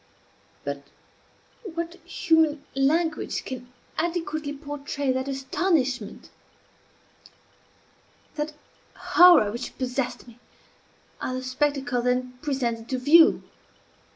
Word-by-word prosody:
But 140 0 -5 0.8
what 335 -4 -4
human 320 -4 +2
language 310 +4 0
can 250 -1 -7 0.3
adequately 325 -3 -2
portray 285 -1 -3
that 260 +1 -2
astonishment, 270 - -1 2.0
that 300 0 -3 0.4
horror 350 -12 +6
which 240 +3 -6
possessed 255 -1 -3
me 235 0 -15 0.8
at 255 - -2
the 255 0 -4
spectacle 255 -1 0
then 250 +1 0
presented 240 -6 -2
to 260 - -1
view? 315 +6 +6
275 Hz, 90 wpm, -25 LUFS, 250-315 Hz, 2.0 s, horror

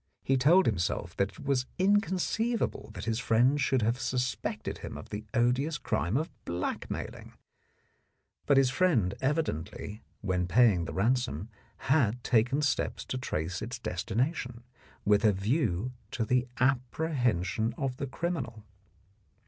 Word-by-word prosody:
He 135 - +2
told 160 +9 +5
himself 90 -3 -1
that 100 0 +1
it - - -11
was 130 -2 +1
incon 200 0 +3
ceivable 225 +5 -1
that - - -6
his 115 0 0
friend 125 +5 +3
should 130 -2 +2
have 115 +4 +1
suspected 125 0 -2
him - - -7
of - - -10
the 105 +1 -5
odious 125 +6 +2
crime 85 - 0
of 155 +3 -2
blackmailing, 85 +1 -4 1.1
but 140 - +5
his 135 -2 +5
friend 130 - +2
evidently 110 - -2 0.2
when 90 -3 0
paying 105 -4 +4
the 70 - -5
ransom 110 - 0 0.4
had 125 -5 +3
taken 125 +5 +2
steps 140 - 0
to 130 - -3
trace 90 -6 -3
its 115 +3 -4
destination, 120 - -2 0.4
with 105 0 +4
a 110 - +6
view 110 - 0 0.2
to 115 - -2
the 125 +1 +2
appre 135 +5 0
hension 110 -3 +1
of 130 -2 -2
the 140 - -3
criminal. 130 -7 -3
125 Hz, 140 wpm, -30 LUFS, 105-135 Hz, 1.1 s, a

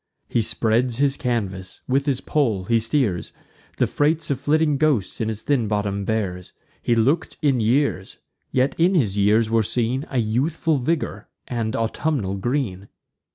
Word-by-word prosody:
He 120 - +1
spreads 115 +2 +1
his 140 0 +2
canvas; 100 -9 -3
with 140 +3 +1
his 135 -3 +1
pole 115 -11 0
he 115 +3 +3
steers; 110 -5 0 0.5
The - - +3
freights 155 +1 0
of 135 - -1
flitting 150 -1 +2
ghosts 140 -11 0
in 110 - 0
his 110 -1 -4
thin 130 -6 +1
bottom 100 -1 -1
bears. 95 -5 -3 0.3
He 120 - +1
look'd 135 +9 +1
in 135 -4 +3
years; 115 -3 0 0.3
yet 130 +2 +2
in 180 +3 +4
his 105 - +1
years 110 +2 +3
were 115 0 +4
seen 120 +5 -1
A 135 - -3
youthful 140 +7 +1
vigour 130 -6 -2 0.2
and 115 -3 -2
autumnal 115 -3 -1
green. 105 -4 -2
120 Hz, 155 wpm, -22 LUFS, 105-140 Hz, 0.5 s, in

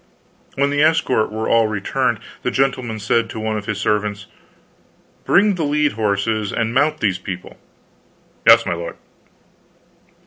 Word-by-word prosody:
When 140 +1 +1
the 145 0 +1
escort 155 -9 +2
were 110 +1 -3
all 115 -1 +3
returned, 110 +3 -1 0.2
the - - -1
gentleman 130 -3 -1
said 115 +2 0
to - - -6
one 110 0 -2
of 105 -1 -5
his 105 -2 -2
servants: 105 -1 -1 1.0
"Bring 205 +2 +4
the 175 -3 -3
led 150 0 +1
horses 105 0 -1
and 115 0 -1
mount 145 +4 +1
these 95 -4 0
people." 90 -2 -8 0.9
"Yes, - - +8
my - - -1
lord." 85 0 -6
110 Hz, 145 wpm, -19 LUFS, 105-135 Hz, 1.0 s, Yes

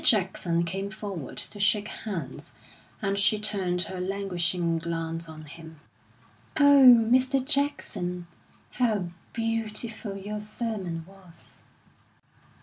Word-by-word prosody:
Jackson 180 -5 +2
came 195 +3 -3
forward 190 -7 -6
to 205 - -3
shake 205 +1 +3
hands, 185 -10 -6 0.5
and 195 0 0
she 210 +2 +4
turned 195 -4 0
her 185 -1 -5
languishing 180 -3 0
glance 165 0 -4
on 155 0 -10
him. 160 +1 -11 0.8
"Oh, 285 -2 +7 0.3
Mr. 260 +1 +3
Jackson, 200 - 0 0.5
how 215 -8 0 0.2
beautiful 225 -2 -2
your 210 +2 -5
sermon 210 -6 -4
was!" 190 -3 -17
195 Hz, 105 wpm, -27 LUFS, 170-215 Hz, 0.8 s, Oh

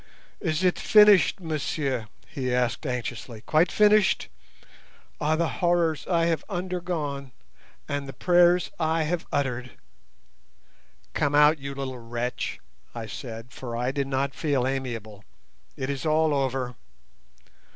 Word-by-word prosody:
"Is 160 0 -1
it 180 -1 +2
finished, 210 -3 +6
monsieur?" 145 - -2 0.2
he 130 -2 -3
asked 125 +4 0
anxiously; 120 -2 -4
"quite 160 +7 +2
finished? 210 -1 +4 0.9
Ah, 155 +1 +1
the 165 +1 +1
horrors 170 -3 +1
I 170 -2 +2
have 165 -1 0
undergone, 175 -7 -3 0.6
and 145 -1 -3
the 135 - -7
prayers 175 0 +4
I 160 0 +1
have 165 +2 -2
uttered!" 125 -3 -2 1.4
"Come 145 -1 +1
out, 150 +1 +6
you 140 0 -6
little 130 -2 -5
wretch," 120 +2 -4 0.4
I 115 -1 -4
said, 115 +1 -8
for 120 -2 -6
I 125 +2 0
did 140 0 -2
not 135 0 -1
feel 140 -4 0
amiable; 115 -6 -4 0.5
"it 130 - -3
is 140 -1 -3
all 155 -1 +2
over." 130 -2 -1
140 Hz, 130 wpm, -26 LUFS, 125-165 Hz, 1.4 s, finished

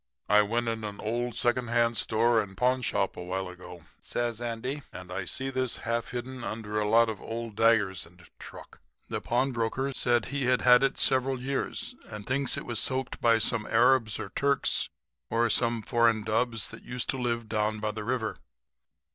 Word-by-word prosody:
"'I 105 0 +7
went 115 +3 -1
in 115 -1 -2
an 105 -1 -6
old 120 +2 -2
second 120 0 +1
hand 120 0 +2
store 115 +1 +2
and 95 -2 -9
pawnshop 125 -6 +1
a - - -7
while 95 +1 -3
ago,' 90 -2 -11 0.2
says 120 -1 -2
Andy, 120 +5 -3
'and 90 -1 -9
I 90 0 -3
see 135 +7 -3
this 130 -2 -1
half 115 0 -1
hidden 125 0 -5
under 110 -2 -3
a 105 0 0
lot 115 +1 +5
of 110 -3 -5
old 115 -1 -5
daggers 110 -4 +3
and 90 -1 -19
truck. - - -12 0.3
The - - -3
pawnbroker 125 +1 0
said 120 -3 +2
he'd 130 -3 +2
had 125 -1 +7
it 135 0 +1
several 130 0 +2
years 135 +2 -3
and 105 -1 -8
thinks 130 0 0
it - - -5
was 120 -3 -1
soaked 130 0 -1
by 115 -1 +5
some 110 0 0
Arabs 115 -1 +3
or - - -5
Turks 140 0 +1 0.4
or 115 0 +2
some 115 -2 +2
foreign 115 -2 +2
dubs 115 +1 -1
that 115 - -10
used 125 -1 -5
to 135 - 0
live 120 -2 -1
down 105 0 0
by 105 0 -1
the 105 0 -6
river. 115 -1 -2
115 Hz, 185 wpm, -28 LUFS, 110-125 Hz, 0.4 s, I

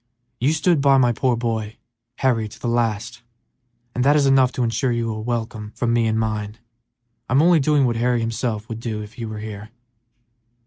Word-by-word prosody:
"You 130 +5 +2
stood 160 0 +2
by 140 -1 +5
my 125 -2 +4
poor 125 +1 +1
boy, 115 -2 -3 0.4
Harry, 120 -5 +1
to 105 - -13
the - - -4
last, 115 0 -1 0.7
and 125 - 0
that 145 +2 +4
is 145 -2 +3
enough 135 -2 +4
to 125 - -1
insure 120 +2 0
you 115 -1 -1
a 110 - -5
welcome 110 -2 -4
from 115 -1 0
me 115 -1 +2
and 110 0 0
mine. 110 -1 -2 0.7
I'm 130 +3 +3
only 170 +1 +5
doing 145 -1 +3
what 120 -2 0
Harry 120 +1 +1
himself 115 -1 -2
would 115 -2 -6
do 110 -2 -4
if 105 +1 -12
he 115 - -6
were 110 -1 -6
here." 105 0 -7
115 Hz, 195 wpm, -22 LUFS, 110-130 Hz, 0.7 s, by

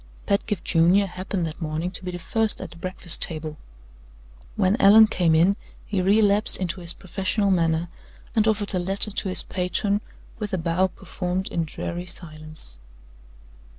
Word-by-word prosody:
Pedgift 200 -1 -1
Junior 175 +5 +3
happened 185 -1 -4
that 160 +2 -7
morning 160 +3 -3
to 185 - -4
be 180 - -4
the 175 - -5
first 220 +5 -1
at - - -8
the - - -13
breakfast 180 0 +2
table. 155 -2 -3 1.0
When 195 -1 +2
Allan 210 +3 +8
came 175 -6 +1
in, 180 +5 +3 0.3
he 195 -3 -1
relapsed 205 +2 +4
into 185 0 -3
his 170 -1 +4
professional 195 +2 -1
manner, 165 -2 +1 0.5
and 220 -1 +3
offered 210 -2 +1
a 185 - 0
letter 195 +4 +3
to 195 -1 -2
his 185 - +2
patron 200 +3 -1 0.4
with 210 -2 -5
a - - +1
bow 170 +2 +1
performed 185 0 -4
in 165 -1 -2
dreary 175 +3 -6
silence. 155 - -9
185 Hz, 160 wpm, -24 LUFS, 170-200 Hz, 1.0 s, Allan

